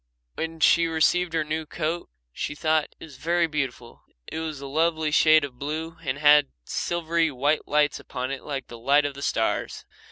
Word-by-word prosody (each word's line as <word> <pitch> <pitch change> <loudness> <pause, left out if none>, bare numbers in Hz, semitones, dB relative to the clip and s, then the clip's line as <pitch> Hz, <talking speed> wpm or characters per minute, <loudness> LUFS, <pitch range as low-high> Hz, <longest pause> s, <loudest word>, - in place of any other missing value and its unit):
When 165 0 -5
she 170 +2 +5
received 165 +2 +2
her 160 -1 +1
new 155 +1 -3
coat 165 +4 -3 0.2
she 145 - -4
thought 155 0 +1
it - - -9
was 145 -5 -14
very 170 +3 +1
beautiful. 135 -6 -4 0.2
It 160 - -5
was 160 -3 -4
a 140 - -8
lovely 160 +2 0
shade 155 0 +5
of 125 -3 -12
blue 160 +3 -4
and 135 -3 -2
it - - -10
had 150 -1 +6 0.2
silvery 170 -1 0
white 145 +3 0
lights 150 0 +2
upon 130 +1 -5
it 140 - -5
like 135 -3 -5
the 120 - -11
light 140 +5 +3
of 145 - -2
the 140 - -10
stars. 115 -5 -1
155 Hz, 195 wpm, -25 LUFS, 140-160 Hz, 0.2 s, had